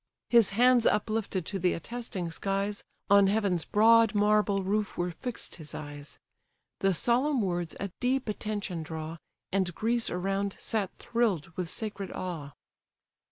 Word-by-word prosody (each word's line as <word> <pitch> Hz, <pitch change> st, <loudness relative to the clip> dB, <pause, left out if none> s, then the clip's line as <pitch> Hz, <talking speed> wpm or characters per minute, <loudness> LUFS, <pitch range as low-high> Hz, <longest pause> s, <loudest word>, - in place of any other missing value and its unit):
His 230 Hz, -5 st, +5 dB
hands 245 Hz, -1 st, +5 dB
uplifted 210 Hz, -4 st, 0 dB
to 195 Hz, +2 st, -3 dB
the 180 Hz, 0 st, +2 dB
attesting 195 Hz, -3 st, -5 dB
skies, 195 Hz, +3 st, -2 dB, 0.3 s
On 200 Hz, -1 st, +7 dB
heaven's 195 Hz, -5 st, +1 dB
broad 225 Hz, +1 st, +5 dB
marble 205 Hz, -1 st, +3 dB
roof 205 Hz, +2 st, -1 dB
were 175 Hz, 0 st, -1 dB
fixed 235 Hz, +5 st, -5 dB
his 155 Hz, -3 st, -8 dB
eyes. 145 Hz, -1 st, -8 dB, 0.6 s
The 195 Hz, -, +3 dB
solemn 245 Hz, -, +2 dB
words 175 Hz, -3 st, -2 dB
a 200 Hz, -1 st, -4 dB
deep 255 Hz, +1 st, 0 dB
attention 205 Hz, -4 st, -3 dB
draw, 160 Hz, +1 st, -6 dB, 0.3 s
And 185 Hz, -3 st, 0 dB
Greece 235 Hz, +1 st, 0 dB
around 195 Hz, +2 st, -1 dB
sat 210 Hz, -4 st, -2 dB
thrill'd 230 Hz, -10 st, 0 dB
with 170 Hz, 0 st, -4 dB
sacred 205 Hz, -2 st, -4 dB
awe. 160 Hz, -6 st, -5 dB
200 Hz, 140 wpm, -29 LUFS, 175-220 Hz, 0.6 s, On